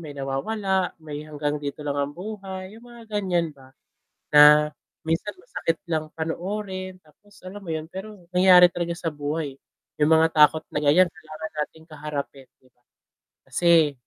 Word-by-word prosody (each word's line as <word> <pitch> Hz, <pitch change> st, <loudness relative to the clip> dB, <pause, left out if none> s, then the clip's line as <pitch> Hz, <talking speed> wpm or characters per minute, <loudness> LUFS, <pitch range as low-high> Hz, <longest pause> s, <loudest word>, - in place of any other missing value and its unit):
may 150 Hz, -3 st, -9 dB
nawawala, 190 Hz, +8 st, -1 dB
may 150 Hz, -2 st, -7 dB
hanggang 150 Hz, -1 st, -3 dB
dito 145 Hz, +1 st, -6 dB
lang 145 Hz, -1 st, -1 dB
ang 140 Hz, +1 st, -2 dB
buhay, 190 Hz, -1 st, -7 dB
yung 230 Hz, -, -15 dB
mga 235 Hz, -1 st, -13 dB, 0.2 s
ganiyan 175 Hz, -4 st, 0 dB
ba. 135 Hz, -2 st, -19 dB, 0.5 s
Na 150 Hz, 0 st, +8 dB, 0.3 s
minsan 165 Hz, +6 st, -2 dB
masakit 165 Hz, -, -2 dB
lang 155 Hz, -1 st, 0 dB
panoorin 185 Hz, +3 st, -4 dB
tapos 205 Hz, +7 st, -24 dB
alam 185 Hz, +3 st, -8 dB
mo 190 Hz, -5 st, -9 dB
yun, 160 Hz, +1 st, -6 dB
pero 200 Hz, +3 st, -8 dB, 0.2 s
nangyari 180 Hz, -1 st, +7 dB
talaga 170 Hz, -1 st, -3 dB
sa 170 Hz, -1 st, -3 dB
buhay 145 Hz, -1 st, -4 dB, 0.4 s
yung 150 Hz, +1 st, +3 dB
mga 160 Hz, 0 st, +4 dB
takot 155 Hz, 0 st, +5 dB
na -, -, -2 dB
ganiyan 160 Hz, +5 st, +4 dB
kailangan 155 Hz, -1 st, -9 dB, 0.2 s
nating 160 Hz, 0 st, -19 dB
kaharapin, 145 Hz, -2 st, -6 dB, 0.2 s
'di 130 Hz, -, -25 dB
ba. 125 Hz, -, -42 dB, 0.6 s
Kasi 165 Hz, -4 st, +4 dB
160 Hz, 160 wpm, -24 LUFS, 150-185 Hz, 0.6 s, Na